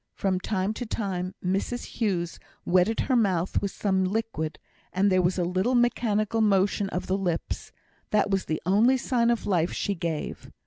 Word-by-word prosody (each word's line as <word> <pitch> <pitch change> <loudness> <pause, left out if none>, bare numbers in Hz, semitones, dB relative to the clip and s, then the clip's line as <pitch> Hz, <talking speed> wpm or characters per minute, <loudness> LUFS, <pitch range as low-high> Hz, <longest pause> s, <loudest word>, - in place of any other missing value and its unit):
From 190 -2 0
time 195 +1 -1
to 245 - -5
time 185 -4 -3
Mrs 195 +6 -1
Hughes 180 -7 -2 0.3
wetted 185 +5 +3
her 260 - +1
mouth 190 -6 +1
with 200 - -1
some 190 -1 0
liquid, 185 -6 -2 0.3
and 195 +2 +2
there 185 0 +4
was 180 +1 +1
a 180 - +1
little 185 +8 +1
mechanical 225 -2 +1
motion 200 -1 +2
of 180 - -3
the 190 - 0
lips; 175 -4 -3 0.4
that 205 -1 +2
was 195 -1 +1
the 155 - -2
only 220 +8 +4
sign 235 -2 +1
of 235 -1 0
life 175 -3 +1
she 200 - -1
gave. 165 -4 -4
195 Hz, 175 wpm, -27 LUFS, 180-220 Hz, 0.4 s, there